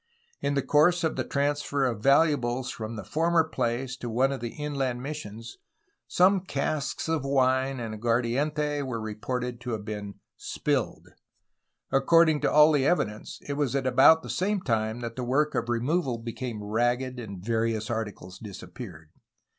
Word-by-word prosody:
In 140 0 0
course 170 +4 +4
of 160 - 0
the - - -1
transfer 145 -1 0
of 115 -5 -2
valuables 135 -3 +2
from 110 0 -6
the 110 - -6
former 165 +1 +2
place 125 -3 -2
to 120 - -5
one 130 +4 +2
of 135 - -3
the 120 - -4
inland 135 -4 -2
missions 120 -6 -7 0.5
some 190 +2 +4
casks 150 -4 -2
of 160 -3 0
wine 130 -1 +1
and 115 -2 -4
aguardiente 130 +7 0
were 130 -4 -3
reported 120 +3 -4
to 120 -1 -4
have 105 -2 -4
been 105 -2 -5 0.2
"spilled." - - -2 0.8
According 160 +3 +4
to - - +1
all 150 +1 +7
the 145 -3 +3
evi 175 +7 +3
dence 105 0 -9
it 145 - -2
was 140 -3 -1
at 135 -1 0
about 135 +5 +6
the - - -8
same 200 +1 0
time 110 -3 -1
that 115 -1 -5
the 130 - -4
work 145 +5 +1
of 120 - -2
removal 125 +2 0
became 115 -1 -5
ragged 120 +4 0
and 100 -5 -8
various 115 -1 0
articles 105 -5 -5
disappeared. 90 -5 -10
130 Hz, 160 wpm, -27 LUFS, 115-145 Hz, 0.8 s, all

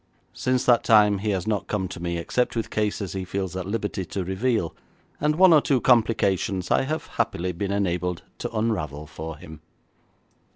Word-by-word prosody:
Since 130 0 0
that 120 -2 +4
time 105 -2 +5
he 105 +2 -2
has 95 -3 -1
not 105 -2 -1
come 95 -3 -1
to 90 - -8
me 85 0 -2
except 125 +10 -1
with 115 - -3
cases 105 -2 -1
he 95 -1 -3
feels 95 0 -4
at 95 -1 -4
liberty 105 -2 -2
to 95 +2 -4
reveal, 95 0 -1 0.4
and 150 +1 +1
one 185 0 +7
or 150 - +6
two 135 -2 +2
complications 105 -6 +2
I - - +4
have 155 +3 -3
happily 90 +2 -2
been 95 +3 -3
enabled 90 -3 -1 0.2
to - - -3
unravel 80 -10 -2
for 80 +1 -7
him. 80 0 -12
100 Hz, 180 wpm, -25 LUFS, 90-115 Hz, 0.4 s, one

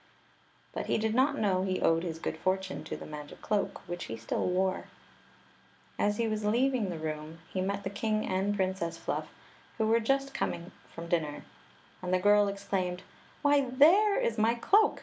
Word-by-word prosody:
But - - -4
he - - +2
did 220 0 0
not 275 +4 +3
know 190 -4 +2
he 185 -1 -1
owed 165 0 +3
his 165 -2 -4
good 165 - -3
fortune 185 0 -2
to - - -5
the - - -9
magic 150 -1 -9
cloak, 210 -2 -1
which 175 0 -4
he 115 - -6
still 115 - -2
wore. 185 +1 0 1.1
As 205 0 +2
he 230 - +1
was 215 -1 -2
leaving 235 0 +2
the 175 - -4
room, 155 0 -5 0.2
he 185 - 0
met 200 +1 -2
the 195 - -3
king 215 +1 -1
and 195 +2 0
Princess 185 -4 -1
Fluff, - - -3 0.5
who 220 - +1
were 225 +1 +4
just 275 +4 0
come 170 +2 -3 0.2
from 170 0 -8
dinner; 160 -4 -1 0.6
and 180 -1 -3
the 185 - +4
girl 205 +2 +5
exclaimed: 190 -2 -2 0.4
"Why, 285 -2 +4
there 360 +11 +5
is 230 -1 0
my 225 +2 +3
cloak! 415 - +3
195 Hz, 185 wpm, -30 LUFS, 175-225 Hz, 1.1 s, girl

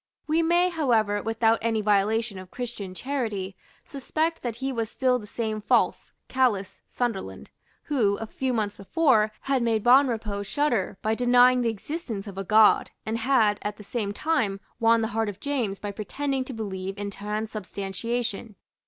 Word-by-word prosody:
We 315 +2 +2
may, 345 +2 +3
however, 225 - +1
without 225 +1 +2
any 225 -1 +1
violation 210 +1 +1
of 185 -1 -11
Christian 215 -7 -6
charity, 215 -7 -3 0.3
suspect 315 +4 -2
that 240 -3 -3
he 265 +3 -3
was 225 -3 -2
still 255 0 +1
the 210 - -10
same 220 -1 -3
false, - - +1 0.2
callous, 220 -8 0
Sunderland 190 - -4 0.3
who, 215 -9 +1
a 225 - -5
few 260 +4 -2
months 210 -4 -1
before, 220 - +2
had 270 -2 0
made 225 -3 +1
Bonrepaux 235 -5 +3
shudder 210 -3 0
by 220 - +1
denying 245 +1 +5
the 235 - +1
existence 225 - -5
of 195 -2 -7
a - - -2
God, 215 +2 +5 0.2
and 225 +1 -2
had, 220 -6 +3
at 210 0 -4
the 210 - -11
same 205 -1 -3
time, 215 -6 0 0.2
won 230 0 +4
the 220 - -1
heart 225 -1 0
of 200 -1 -8
James 245 -8 -2
by 205 0 -5
pretending 270 +6 -2
to 265 - -7
believe 195 -3 -5
in 205 0 -4
transubstantiation. 210 +1 -4
225 Hz, 165 wpm, -26 LUFS, 205-255 Hz, 0.3 s, denying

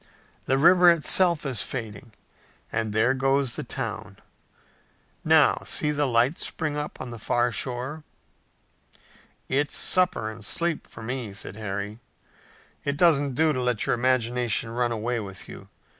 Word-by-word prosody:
The 135 - +2
river 175 +4 +6
itself 170 +1 +3
is 130 -8 -1
fading, 110 -2 -6 0.6
and 110 -1 -2
there 110 +4 +2
goes 135 -1 0
the - - -4
town! - - -5 1.1
Now, - - +4
see 150 - +2
the 145 -1 0
lights 125 +5 +1
spring 155 -3 -4
up 150 0 -5
on 125 -2 -7
the 120 - -8
far 120 +3 0
shore!" 130 +6 -4 1.4
"It's 145 +2 0
supper 180 - +5
and 110 0 -12
sleep 170 +9 -2
for 115 - -12
me," 120 -3 -5
said 100 - -7
Harry. 105 0 -5 0.8
"It 145 0 -2
doesn't 145 -5 +3
do 155 +2 +2
to 130 - -2
let 125 -3 -1
your - - +1
imagination 120 -2 0
run 120 0 -1
away 115 +1 -2
with 95 -4 -8
you. - - -12
125 Hz, 145 wpm, -25 LUFS, 115-145 Hz, 1.4 s, river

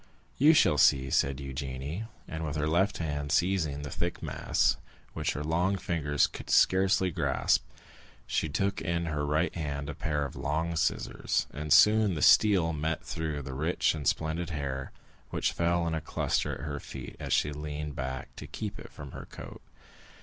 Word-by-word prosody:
"You 155 +4 +7
shall 75 - +4
see," 65 -1 +4
said 70 -1 +2
Eugénie. 70 +7 -5 0.2
And 80 0 -5
with 75 -1 -3
her 75 0 0
left 95 +6 +2
hand 75 -3 -3
seizing 80 -5 +1
the 70 - -6
thick 85 0 -3
mass, - - +1 0.4
which - - -1
her 75 - -4
long 90 +5 +1
fingers 75 -6 +1
could - - -8
scarcely 95 0 +4
grasp, - - +1 0.6
she 80 - -1
took 100 +7 -1
in 85 0 -1
her 75 -2 -2
right 75 +4 +1
hand 70 -3 -3
a - - -7
pair 75 -1 -1
of 70 - -7
long 80 +3 -1
scissors, - - 0
and 75 +1 -5
soon 105 +5 +6
the 75 - -1
steel 95 -6 +5
met 80 +1 -2
through 80 -2 -3
the 65 - -6
rich 80 +6 +1
and 75 -4 -4
splendid 80 +2 0
hair, 70 -4 -4 0.4
which - - 0
fell 85 0 +1
in 85 - -1
a 80 - -1
cluster - - -1
at - - -9
her 70 -1 -4
feet 65 -2 -8
as - - -5
she 75 - +2
leaned 75 0 -5
back 65 0 -5
to - - -8
keep - - -5
it - - -10
from 70 -2 -9
her - - -8
coat. - - -10
75 Hz, 180 wpm, -29 LUFS, 70-85 Hz, 0.6 s, You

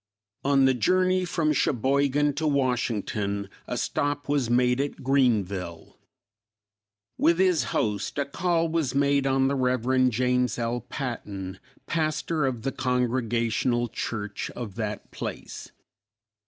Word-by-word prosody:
On 135 -1 +4
the 130 - +5
journey 185 +8 +2
from 165 -3 +1
Cheboygan 140 +2 +2
to 155 +2 -1
Washington, 110 -7 0 0.2
a - - -3
stop 145 0 -1
was 140 -4 +1
made 125 +1 +3
at 140 -1 -4
Greenville. 100 - 0 1.2
With 170 0 +4
his 185 -3 +3
host, 105 +2 -1
a 140 - +1
call 165 +3 0
was 160 -5 -1
made 140 0 +2
on 135 0 +3
the 140 - +1
Rev. 130 0 +2
James 125 +1 +1
L. 120 0 -1
Patton, 100 -8 -5 0.3
pastor 155 -2 0
of 120 -4 -3
the 135 - -1
Congregational 120 -1 0
Church 105 -2 -4
of 115 -5 -6
that 105 0 -5
place. - - -7
130 Hz, 125 wpm, -26 LUFS, 115-145 Hz, 1.2 s, the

